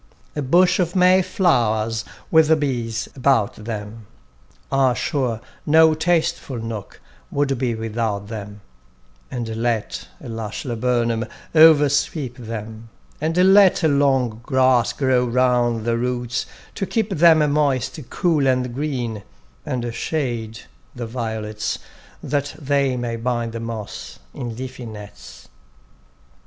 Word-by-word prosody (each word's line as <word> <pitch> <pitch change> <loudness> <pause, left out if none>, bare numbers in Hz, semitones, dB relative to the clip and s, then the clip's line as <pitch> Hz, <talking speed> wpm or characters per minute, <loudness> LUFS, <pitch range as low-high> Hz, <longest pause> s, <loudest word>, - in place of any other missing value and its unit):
A 150 - -1
bush 175 +8 +4
of 175 0 0
May 185 +1 +5
flowers 115 - +1 0.3
with 160 -1 +6
the 160 - +5
bees 120 -6 -2
about 130 -6 +2
them; 105 0 -7 0.6
Ah, 135 -2 +3
sure 125 -3 -1 0.2
no 160 +1 +5
tasteful 165 -4 0
nook 115 -3 -6 0.3
would 140 -1 0
be 120 -3 0
without 110 -2 -2
them; 105 -2 -7 0.7
And 120 -2 -4
let 115 -3 -2
a - - -10
lush 115 0 -5
laburnum 120 -1 0 0.3
oversweep 150 -4 +4
them, 115 -1 -7 0.3
And 180 +5 +4
let 195 -3 +6
long 135 -6 +2
grass 130 -2 +3
grow 130 -2 +2
round 120 -2 +1
the 115 0 +1
roots 125 0 -2 0.3
to 195 - -3
keep 220 -3 -1
them 160 -4 +5
Moist, 145 -2 0
cool 155 -6 +1
and 125 -1 +1
green; 125 -6 -3 0.5
and 120 -4 -2
shade 115 -5 -3 0.3
the 120 - -4
violets, 110 -2 -3 0.5
That 145 +1 -2
they 140 -3 0
may 120 -1 -3
bind 120 0 -2
the 115 - -5
moss 115 -2 -6 0.2
in 120 -2 -5
leafy 125 0 -7
nets. 65 - -11
125 Hz, 120 wpm, -21 LUFS, 115-145 Hz, 0.7 s, with